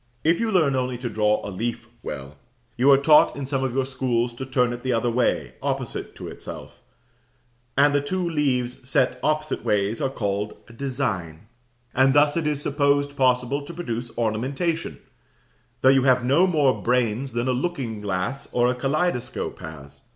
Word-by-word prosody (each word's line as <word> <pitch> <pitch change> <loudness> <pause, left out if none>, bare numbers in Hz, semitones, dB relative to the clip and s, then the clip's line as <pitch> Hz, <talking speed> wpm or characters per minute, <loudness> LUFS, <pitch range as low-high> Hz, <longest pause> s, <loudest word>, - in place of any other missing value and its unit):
If 165 +2 +3
you 230 -1 0
learn 155 -8 +3
only 125 -1 -1
to 120 0 -4
draw 105 0 +2
a - - -5
leaf 115 +5 -4
well, 70 +1 -7 0.4
you 130 +3 +3
are 135 - +8
taught 150 +2 +5
in 140 - -4
some 135 0 -1
of 130 -1 -2
our 135 - +2
schools 125 -3 -1
to 130 +2 -7
turn 125 -2 +1
it 120 - -7
the 130 - -1
other 120 +1 +1
way, 125 +1 0
opposite - - -3
to - - -8
itself; - - -9 1.0
and 145 +1 +5
the 145 - +3
two 180 +5 -2
leaves 130 -5 -1
set 130 -1 +2
opposite 155 0 -1
ways 105 +2 0
are 135 - +1
called 105 -4 -2
"a 120 - -14
design:" 115 - -3 0.5
and 130 +1 +4
thus 145 0 +5
it 165 -2 0
is 150 -1 -1
supposed 145 0 +1
possible 130 +1 +1
to 160 +4 -9
produce 120 -8 -4
ornamentation, 135 +9 -1 0.8
though 130 - +6
you 135 0 +5
have 125 -2 +4
no 150 +9 +4
more 150 -7 +2
brains 125 +1 0
than 120 +1 -1
a - - +2
looking 125 -6 -2
glass 100 +6 -3
or 120 0 +3
a - - +1
kaleidoscope 135 0 -2
has. 70 -3 -10
130 Hz, 180 wpm, -24 LUFS, 120-140 Hz, 1.0 s, are